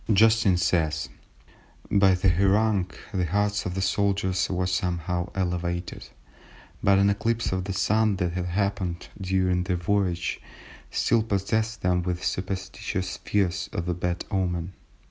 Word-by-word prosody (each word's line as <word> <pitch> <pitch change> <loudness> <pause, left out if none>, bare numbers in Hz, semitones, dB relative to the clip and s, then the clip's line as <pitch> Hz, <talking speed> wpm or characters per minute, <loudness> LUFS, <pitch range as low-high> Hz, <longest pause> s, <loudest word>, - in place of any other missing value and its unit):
Justin 110 -2 +5
says:— 80 -5 0 0.8
"By 100 -2 +5
the 90 +1 +2
harangue 100 +1 +2 0.2
the 90 -3 0
hearts 105 +3 0
of 90 - -4
the 95 - -1
soldiers 95 -1 +1
were 90 -1 0
somewhat 90 -1 -1
elevated, 90 -1 -2 0.7
but 100 0 +4
an 100 +1 +4
eclipse 115 +3 0
of 95 -1 -1
the 100 - -3
Sun 110 +2 +2
that 90 -2 -1
had 90 0 -2
happened 95 -2 -2
during 95 -1 +1
their 90 0 -1
voyage 90 -1 0 0.5
still 115 -1 +2
possessed 110 +1 -1
them 90 0 +2
with 90 0 -3
superstitious 95 0 -3
fears 90 -5 -1
of 85 - -3
a 90 - +1
bad 90 0 -2
omen. 90 -2 -1
95 Hz, 140 wpm, -26 LUFS, 90-100 Hz, 0.8 s, Justin